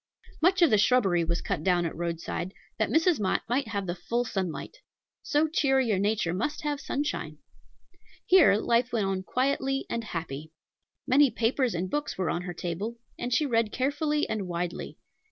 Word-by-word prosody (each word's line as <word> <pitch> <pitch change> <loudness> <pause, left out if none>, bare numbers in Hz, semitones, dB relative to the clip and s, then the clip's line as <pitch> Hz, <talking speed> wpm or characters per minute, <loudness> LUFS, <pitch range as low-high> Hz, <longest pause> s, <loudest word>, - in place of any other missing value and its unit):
Much 365 +2 +4
of 335 - +5
the 215 - +5
shrubbery 200 -7 +3
was 170 +1 -1
cut 190 -6 -2
down 175 -1 +2
at 165 - -3
Roadside, 170 +2 -4 0.2
that 220 - +1
Mrs. 325 -1 +3
Mott 195 -3 0
might 250 +1 0
have 200 -3 -3
the 175 - -2
full 230 +7 -2
sunlight. 190 - -4 0.4
So 300 +2 +2
cheery 270 -6 +2
a 195 - +1
nature 200 -4 +1
must 295 +13 -2
have 290 -1 -2
sunshine. 290 +2 -3 0.9
Here 360 - +6
life 235 +3 +1
went 220 -4 0
on 195 -1 -1
quietly 270 +5 0
and 230 - -2
happy. 155 -6 -6 0.5
Many 280 +2 +5
papers 235 0 0
and 175 +2 -1
books 295 +9 -3
were 185 -3 0
on 175 - -2
her 180 0 -5
table, 190 +8 -4 0.2
and 245 - -3
she 300 +5 +3
read 230 -5 +1
carefully 295 +3 0
and 205 -4 -3
widely. 175 0 -4
225 Hz, 175 wpm, -28 LUFS, 180-270 Hz, 0.9 s, Here